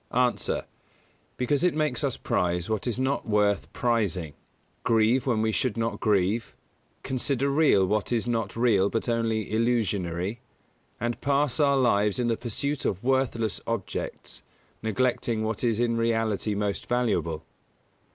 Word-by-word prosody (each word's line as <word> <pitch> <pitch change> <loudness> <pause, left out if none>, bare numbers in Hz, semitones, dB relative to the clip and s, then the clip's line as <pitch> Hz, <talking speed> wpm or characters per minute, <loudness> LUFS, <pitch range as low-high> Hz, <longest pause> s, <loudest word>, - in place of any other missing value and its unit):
_ 125 -1 +1
A. - - -1 0.7
Because 135 +4 +1
it 180 -4 +3
makes 150 -6 0
us - - 0
prize 90 +2 -1
what 110 +2 -1
is 120 - -1
not 130 -2 -1
worth 105 -1 +1
prizing, 100 -10 0 0.5
grieve 115 +4 +3
when 110 -4 +2
we 110 - +1
should 115 0 -1
not 115 0 -1
grieve, 105 +2 +1 0.5
consider 135 +1 0
real 140 -10 +4
what 105 +4 -1
is 115 -2 +1
not 115 -4 -2
real 110 -5 +3
but 115 - -2
only 115 -3 -1
illusionary, 105 -4 0 0.6
and 120 +1 -2
pass 140 0 +1
our 140 -2 +4
lives 105 -5 +2
in 120 -1 0
the 115 - +2
pursuit 130 +5 -3
of 95 +1 -2
worthless 120 -6 0
objects, 115 -5 -4 0.4
neglecting 115 0 0
what 110 +2 -2
is 115 -2 +1
in 120 -1 +1
reality 115 -2 0
most 100 0 -2
valuable. 110 -10 0
115 Hz, 145 wpm, -27 LUFS, 105-125 Hz, 0.7 s, real